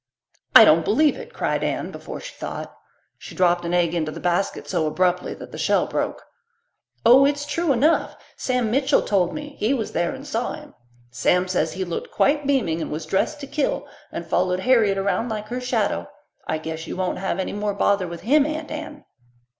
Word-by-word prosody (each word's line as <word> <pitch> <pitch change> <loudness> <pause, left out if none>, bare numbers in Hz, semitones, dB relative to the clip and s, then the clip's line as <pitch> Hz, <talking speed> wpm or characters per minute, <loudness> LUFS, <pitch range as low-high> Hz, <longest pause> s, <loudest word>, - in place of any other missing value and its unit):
"I - - +11
don't - - +5
believe 305 -1 +3
it," 485 -1 -9
cried - - -1
Anne, - - -2
before - - -8
she - - -9
thought. - - -7 0.4
She - - -10
dropped 175 -2 +2
an 170 - -2
egg 175 -2 +2
into 155 -3 -1
the 165 - -8
basket 175 +3 -1
so 170 -4 0
abruptly 180 +3 0
that - - -11
the - - -8
shell - - +2
broke. - - -3 0.8
"Oh, 250 +4 +8
it's 285 +1 +1
true 335 +1 0
enough. 285 +6 +2 0.2
Sam 250 -4 -1
Mitchell 270 +3 +3
told 185 -4 +1
me; 295 -1 -7
he 235 +6 +2
was 225 -5 -3
there 170 0 -1
and 275 - -10
saw 245 -4 -2
him. 300 -1 -11 0.4
Sam 180 +9 +2
says 185 -1 0
he 190 0 -3
looked 175 - -5
quite 290 0 +1
beaming, 215 - +1
and - - -4
was 155 +1 -4
dressed 190 - 0
to - - -5
kill, 290 -1 -1 0.3
and - - -5
followed 180 0 0
Harriet 220 -4 +3
around 200 +4 0
like 215 -1 -5
her 250 +1 -3
shadow. 250 - -1 0.4
I 160 - 0
guess 160 +1 -6
you - - -5
won't 185 -1 -1
have 190 -1 -2
any 190 - -3
more 205 0 -2
bother 200 -2 +2
with 170 0 -7
him, 285 +5 +4
Aunt 310 0 -5
Anne." 305 -1 -7
210 Hz, 200 wpm, -23 LUFS, 180-280 Hz, 0.8 s, I